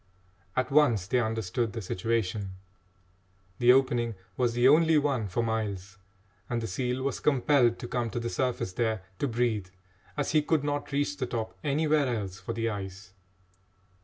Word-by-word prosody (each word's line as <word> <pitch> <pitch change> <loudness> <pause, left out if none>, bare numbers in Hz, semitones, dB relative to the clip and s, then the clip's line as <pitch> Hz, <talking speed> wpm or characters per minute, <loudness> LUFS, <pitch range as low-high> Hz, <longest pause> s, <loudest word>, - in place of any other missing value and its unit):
At 130 - 0
once 135 -10 +4
they 125 +6 +1
understood 110 -1 -1
the 115 - -4
situation. 100 0 -2 1.0
The 120 0 +7
opening 120 -3 +2 0.2
was 120 -2 0
the 120 +1 +5
only 160 +2 +5
one 140 -7 +1
for 100 +5 -1
miles, 100 -4 -3 0.5
and 120 - 0
the 115 - -3
seal 125 +5 -2
was 140 -2 -1
compelled 135 -4 +3
to 120 - -6
come 120 -1 -1
to 120 - -3
the 120 - -3
surface 125 -7 -1
there 110 -2 -1 0.2
to 145 - +1
breathe, 115 -5 0 0.5
as - - 0
he 155 0 +4
could 150 -1 +1
not 145 0 -2
reach 145 +1 0
the 130 -3 -2
top 115 -2 -4
anywhere 150 0 +2
else 100 -6 -3
for 95 +5 -5
the 115 0 -1
ice. 95 -2 -6
120 Hz, 165 wpm, -28 LUFS, 110-135 Hz, 1.0 s, The